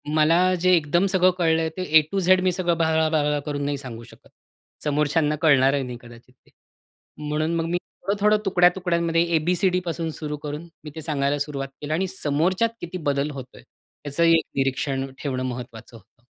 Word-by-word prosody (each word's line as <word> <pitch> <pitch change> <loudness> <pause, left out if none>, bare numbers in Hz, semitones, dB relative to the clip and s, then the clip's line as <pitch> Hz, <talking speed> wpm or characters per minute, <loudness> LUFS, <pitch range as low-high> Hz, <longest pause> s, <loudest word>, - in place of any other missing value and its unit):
मला 155 +2 +4 0.2
जे 185 - +4
एकदम 170 +3 +1
सगळं 185 0 +4
कळलंय 160 -2 +1
ते 185 - -2 0.2
ऐ - - +2
टु 195 - 0
झेड 185 0 +4
मी 185 - +3
सगळं 175 -1 0
"ब्ला, 160 -1 +2
ब्ला" 150 -2 +1
करून 145 -1 -3
नाही 145 0 -1
सांगू 125 -4 -8
शकत. 115 - -17 0.6
समोरच्यांना 150 +1 +1
कळणारही 140 -2 +4
नाही 125 -1 -6
कदाचित 120 +1 -16
ते. 130 - -31 0.8
म्हणून 155 +2 -1
मग 165 - -1
मी 170 +1 -1 0.3
थोडं-थोडं 205 +2 +2
तुकड्या-तुकड्यांमध्ये 175 -2 +2
ए, - - +6
बी, 175 +4 0
सी, 190 +2 +2
डीपासून 175 -2 -2
सुरु 150 -1 -4
करून 150 +3 -7 0.2
मी 155 - -7
ते 160 - -6
सांगायला 145 -2 -1
सुरुवात 140 -1 -3
केली. 150 +1 -5
आणि 190 +4 0
समोरच्यात 180 +5 0
किती 175 +2 -5
बदल 140 +1 0
होतोय 130 -2 -10 0.4
याचंही 165 +4 +3
एक - - -2
निरीक्षण 135 0 -1
ठेवणं 130 -3 -3
महत्वाचं 120 -2 -7
होतं. 120 +1 -25
155 Hz, 180 wpm, -23 LUFS, 140-175 Hz, 0.8 s, ए